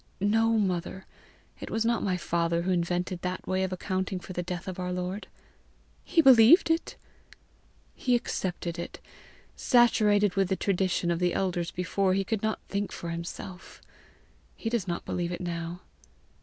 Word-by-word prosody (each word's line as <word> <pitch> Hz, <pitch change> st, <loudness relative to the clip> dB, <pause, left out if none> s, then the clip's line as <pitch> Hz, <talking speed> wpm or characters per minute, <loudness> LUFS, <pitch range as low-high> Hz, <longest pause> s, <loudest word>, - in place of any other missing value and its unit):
"No, 225 Hz, +3 st, +3 dB
mother. 190 Hz, -1 st, -2 dB, 0.5 s
It -, -, -7 dB
was 225 Hz, 0 st, 0 dB
not 235 Hz, 0 st, +1 dB
my 185 Hz, -2 st, 0 dB
father 170 Hz, -1 st, 0 dB
who 185 Hz, -, 0 dB
invented 175 Hz, 0 st, -1 dB
that 180 Hz, 0 st, -4 dB
way 185 Hz, 0 st, 0 dB
of 190 Hz, -1 st, -1 dB
accounting 185 Hz, 0 st, -2 dB
for 185 Hz, -, -9 dB
the 180 Hz, -, -2 dB
death 175 Hz, +1 st, -5 dB
of 185 Hz, -1 st, -5 dB
our 180 Hz, 0 st, -2 dB
Lord." 180 Hz, +3 st, -4 dB, 0.8 s
"He 325 Hz, -, +3 dB
believed 265 Hz, -, +7 dB
it!" 325 Hz, +1 st, -1 dB, 1.0 s
"He 250 Hz, -1 st, +1 dB
accepted 175 Hz, -6 st, -3 dB
it, 170 Hz, -, -6 dB, 0.6 s
saturated 210 Hz, -5 st, +4 dB
with 195 Hz, -2 st, +1 dB
the 190 Hz, -, +2 dB
tradition 185 Hz, -2 st, 0 dB
of 170 Hz, -, -1 dB
the 180 Hz, -1 st, +1 dB
elders 175 Hz, -3 st, -1 dB
before 185 Hz, +1 st, 0 dB
he 195 Hz, -, +1 dB
could 220 Hz, +1 st, -2 dB, 0.2 s
think 200 Hz, 0 st, -2 dB
for 170 Hz, -, -5 dB
himself. 170 Hz, +2 st, -7 dB, 0.8 s
He 225 Hz, -, -4 dB
does 225 Hz, -5 st, -1 dB
not 170 Hz, -1 st, -3 dB
believe 175 Hz, -1 st, -2 dB
it 175 Hz, -, -4 dB
now." 170 Hz, 0 st, -4 dB
185 Hz, 160 wpm, -28 LUFS, 175-205 Hz, 1.0 s, believed